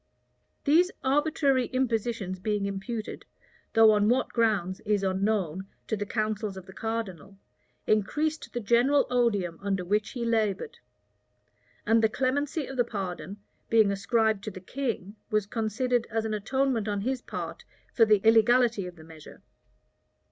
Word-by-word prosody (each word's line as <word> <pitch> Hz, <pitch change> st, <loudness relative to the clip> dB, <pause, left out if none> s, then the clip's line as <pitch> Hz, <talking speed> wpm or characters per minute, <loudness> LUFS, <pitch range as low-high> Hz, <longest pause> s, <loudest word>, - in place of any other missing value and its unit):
These 330 Hz, +5 st, +4 dB
arbitrary 275 Hz, -2 st, +2 dB
impositions 225 Hz, -6 st, -1 dB
being 205 Hz, +1 st, -1 dB
imputed, 210 Hz, +3 st, -5 dB, 0.5 s
though 225 Hz, -1 st, +7 dB
on 210 Hz, 0 st, +3 dB
what 250 Hz, +2 st, +2 dB
grounds 205 Hz, -6 st, 0 dB
is 210 Hz, -2 st, 0 dB
unknown, 190 Hz, -2 st, -1 dB, 0.2 s
to 220 Hz, -, -1 dB
the 205 Hz, -1 st, -4 dB
counsels 215 Hz, -2 st, -2 dB
of 190 Hz, -, -9 dB
the 190 Hz, -, -13 dB
cardinal, 200 Hz, -5 st, -5 dB, 0.5 s
increased 300 Hz, +9 st, 0 dB
the 240 Hz, -, -3 dB
general 240 Hz, +6 st, +3 dB
odium 205 Hz, -9 st, +1 dB
under 195 Hz, -2 st, -1 dB
which 210 Hz, +3 st, 0 dB
he 240 Hz, -2 st, -3 dB
labored: 225 Hz, -, -1 dB, 1.1 s
and 225 Hz, +1 st, +4 dB
the 220 Hz, -, +3 dB
clemency 275 Hz, +5 st, -1 dB
of 270 Hz, -, -8 dB
the 245 Hz, -, +4 dB
pardon, 195 Hz, -3 st, -5 dB, 0.3 s
being 220 Hz, -3 st, +4 dB
ascribed 215 Hz, +1 st, +1 dB
to -, -, -2 dB
the 190 Hz, -2 st, -9 dB
king, 215 Hz, -2 st, -4 dB
was 215 Hz, -1 st, +1 dB
considered 230 Hz, +3 st, -1 dB
as 225 Hz, 0 st, -1 dB
an 220 Hz, -, -2 dB
atonement 240 Hz, +1 st, 0 dB
on 205 Hz, -1 st, -1 dB
his 255 Hz, +3 st, -2 dB
part -, -, -6 dB, 0.3 s
for 230 Hz, -, +5 dB
the 215 Hz, -1 st, +4 dB
illegality 225 Hz, -2 st, +4 dB
of 180 Hz, -, -10 dB
the 160 Hz, -, -14 dB
measure. 160 Hz, -1 st, -14 dB
220 Hz, 150 wpm, -28 LUFS, 200-245 Hz, 1.1 s, though